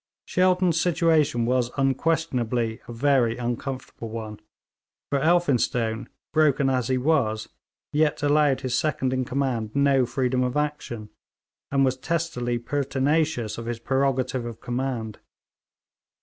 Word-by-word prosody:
Shelton's 180 -2 +2
situation 160 -8 +2
was 125 0 +1
unquestionably 130 -5 0
a - - -7
very 120 -2 +2
uncomfortable 120 -1 -4
one, 110 -1 -6 0.7
for 140 - +2
Elphinstone, 125 -8 +1 0.2
broken 140 -3 +3
as 125 -3 0
he 130 - +1
was, 125 -6 +1 0.4
yet 150 -1 +1
allowed 145 -2 +3
his 130 -1 -1
second 130 -2 0
in 130 -1 0
command 125 -5 -2
no 140 -3 +3
freedom 125 +1 0
of 125 +2 -1
action, 135 -8 -3 0.6
and 135 -1 +3
was 130 0 0
testily 130 -6 -1
pertinacious 140 -1 0
of 115 - -7
his 120 -1 -2
prerogative 130 0 0
of 120 -2 -7
command. 120 -4 -3
130 Hz, 120 wpm, -25 LUFS, 120-145 Hz, 0.7 s, broken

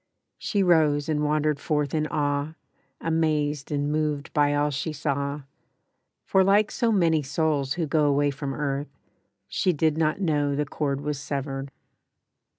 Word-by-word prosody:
She 200 -3 0
rose 155 -5 +3
and 150 -2 0
wandered 150 -1 +1
forth 150 -2 -1
in 155 -1 0
awe, 145 +1 -1 0.5
Amazed 150 -3 0
and 145 0 0
moved 150 -1 -1
by 145 -1 +3
all 145 0 +1
she 145 +4 -3
saw, 140 0 -2 0.8
For, 190 -1 +4
like 200 +2 +3
so 235 -1 +1
many 165 -6 +3
souls 145 -1 0
who 170 -2 -1
go 150 0 +2
Away 145 0 +2
from 135 -1 -5
earth, 140 -1 -3 0.5
she 185 - +1
did 155 0 +1
not 155 +2 +1
know 145 -6 +1
The 150 +1 0
cord 140 -1 -2
was 150 -1 -3
severed. 140 -1 -4
150 Hz, 155 wpm, -25 LUFS, 145-155 Hz, 0.8 s, For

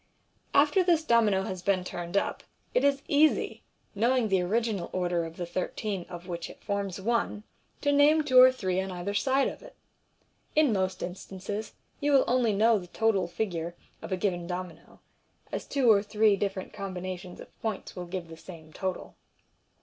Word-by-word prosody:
After 295 +6 +5
this 340 -3 +3
domino 220 -8 +3
has 185 -2 -5
been 185 0 +1
turned 175 +1 -4
up, - - -1 0.3
it - - +2
is 280 0 +2
easy, 300 +2 +2 0.3
knowing 235 +2 +2
the 190 -2 +3
original 210 0 -1
order 175 -2 0
of 165 0 -9
the 175 - -3
thirteen 185 +2 -3
of 175 0 -9
which 170 -2 -5
it - - -14
forms 200 -2 -2
one, 220 0 -1 0.4
to 285 - +2
name 295 +2 +5
two 255 -3 +5
or 255 0 +9
three 190 -7 -1
on 190 - -4
either 180 +3 -4
side 265 +6 +2
of - - -6
it. - - -14 0.8
In 300 -6 +4
most 190 -1 -1
instances 195 +3 -6 0.3
you 290 0 +1
will 270 - +6
only 245 -2 +2
know 215 +2 +4
the 180 - -10
total 220 -1 +1
figure 170 -2 -3 0.3
of - - -8
a 185 - 0
given 180 -3 -1
domino, 180 -1 -7 0.5
as - - -4
two 260 -5 +4
or 200 -2 +5
three 210 0 +3
different 195 -1 -3
combina 185 -3 -5
tion 180 0 -11
of - - -14
points 220 -4 -4
will 180 -1 -6
give 180 -1 -5
the 165 0 -11
same 160 -2 -12
total. 185 -1 -4
200 Hz, 180 wpm, -28 LUFS, 180-235 Hz, 0.8 s, or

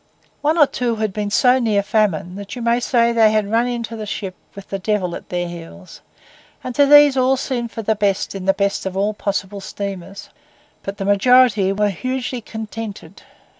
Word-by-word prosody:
One 310 +3 +1
or 300 - +7
two 245 -3 -2
had 215 -2 -2
been 210 0 -3
so 250 +5 +4
near 215 -4 +1
famine 200 -5 0
that 200 +2 -8
you 245 - -6
may 235 +1 +2
say 235 -1 +2
they 225 -2 +4
had 215 -1 0
run 230 +2 +2
into 235 -2 -4
the 215 -1 -6
ship 195 -2 -4 0.2
with 200 -1 -11
the 195 - -3
devil 185 -3 -1
at - - -10
their 175 0 -2
heels; 175 +2 -11 0.6
and 255 - -5
to 285 +2 +4
these 290 -1 +7
all 260 +1 +2
seemed 245 -3 -3
for 225 - -7
the 220 - +2
best 200 -2 -1
in 195 -2 -6
the 195 - +4
best 200 -1 -1
of 190 - -5 0.2
possible 200 0 -3
steamers. 195 -1 -7 0.5
But 195 +1 -6
the 195 - -4
majority 205 -1 +4
were 205 +1 +1
hugely 255 +5 -3
contented. 215 -5 -8
210 Hz, 195 wpm, -19 LUFS, 195-240 Hz, 0.6 s, or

